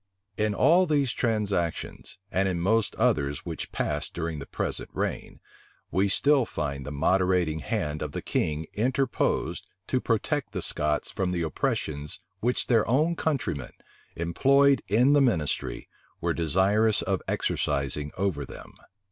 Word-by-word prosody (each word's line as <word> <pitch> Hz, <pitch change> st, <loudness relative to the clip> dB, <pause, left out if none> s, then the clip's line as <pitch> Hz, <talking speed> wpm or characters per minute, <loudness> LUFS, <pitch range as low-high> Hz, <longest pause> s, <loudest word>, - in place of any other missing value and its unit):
In 105 Hz, 0 st, 0 dB
all 180 Hz, -, +5 dB
these 145 Hz, -5 st, +2 dB
transactions, 100 Hz, -12 st, -2 dB
and 95 Hz, +1 st, +1 dB
in 90 Hz, -2 st, -2 dB
most 110 Hz, +4 st, +1 dB
others 70 Hz, -1 st, 0 dB
which -, -, -5 dB
passed -, -, -2 dB
during 80 Hz, -2 st, -3 dB
the 70 Hz, -, -8 dB
present -, -, -3 dB
reign, -, -, -3 dB, 0.5 s
we 95 Hz, +3 st, +2 dB
still 140 Hz, +6 st, +5 dB
find 70 Hz, -, -4 dB
the -, -, -4 dB
moderating 90 Hz, +1 st, +1 dB
hand 75 Hz, 0 st, -2 dB
of 75 Hz, -, -3 dB
the -, -, -4 dB
king 75 Hz, +1 st, -1 dB
interposed 130 Hz, +3 st, 0 dB, 0.2 s
to 130 Hz, -, 0 dB
protect 120 Hz, +5 st, -1 dB
the -, -, -2 dB
Scots 75 Hz, 0 st, 0 dB
from 95 Hz, -2 st, -1 dB
the 90 Hz, -2 st, -1 dB
oppressions 75 Hz, -1 st, -2 dB, 0.2 s
which 120 Hz, +5 st, 0 dB
their 115 Hz, -3 st, +3 dB
own 155 Hz, +8 st, +2 dB
countrymen, 120 Hz, -, -2 dB, 0.4 s
employed 135 Hz, -, +3 dB
in 120 Hz, +8 st, +4 dB
the 145 Hz, -, +5 dB
ministry, 90 Hz, -, 0 dB, 0.3 s
were -, -, 0 dB
desirous 95 Hz, +6 st, +2 dB
of 95 Hz, +1 st, -1 dB
exercising 70 Hz, +2 st, -1 dB
over 95 Hz, -7 st, -1 dB
them. -, -, -11 dB
95 Hz, 140 wpm, -27 LUFS, 80-120 Hz, 0.5 s, all